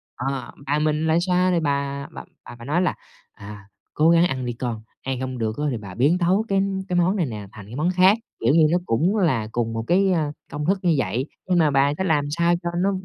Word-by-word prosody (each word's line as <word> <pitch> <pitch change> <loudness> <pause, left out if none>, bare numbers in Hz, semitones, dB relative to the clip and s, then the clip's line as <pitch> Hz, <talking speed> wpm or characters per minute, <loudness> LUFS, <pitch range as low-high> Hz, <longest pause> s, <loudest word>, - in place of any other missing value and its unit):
ờ, 135 +2 -4
bà 145 +2 +1
mình 155 +1 0
lại 160 +1 +3
xoa 180 0 +2
thì 175 - +2
bà 140 -2 -2
bà - - -8 0.2
bà 120 - -10
phải 120 - -11
nói 155 +7 +1
là 180 - 0 0.4
"À, 100 -1 -11 0.3
cố 155 +2 +3
gắng 170 +1 +5
ăn 130 -5 -3
đi 120 - -2
con, 115 -2 -4 0.2
ăn 130 -1 -3
hông 130 -1 -4
được 110 -1 -2 0.2
thì 120 - -2
bà 100 -4 -9
biến 145 +8 +3
tấu 185 +5 +1
cái 195 -1 +1 0.3
cái 180 - -1
món 180 +3 +2
này 180 -5 +1
nè 105 -6 -6
thành 100 -3 -11
cái 110 +4 -10
món 155 +5 0
khác.", 185 +4 +5 0.2
kiểu 140 - +2
như 155 -2 +6
nó 175 - +3
cũng 175 - +1
là 130 - +1
cùng 115 -1 -2
một 115 - -3
cái, 190 +2 +3
a, 155 -4 0 0.2
công 150 +1 -4
thức 190 +3 +1
như 170 -3 +2
vậy 130 0 -1 0.2
nhưng 180 - +2
mà 155 -3 +3
bà 140 +1 +3
có 190 - -1
làm 150 -5 +1
sao 170 +3 +2
cho 170 - -1
nó 195 +3 +2
150 Hz, 255 wpm, -23 LUFS, 125-175 Hz, 0.4 s, như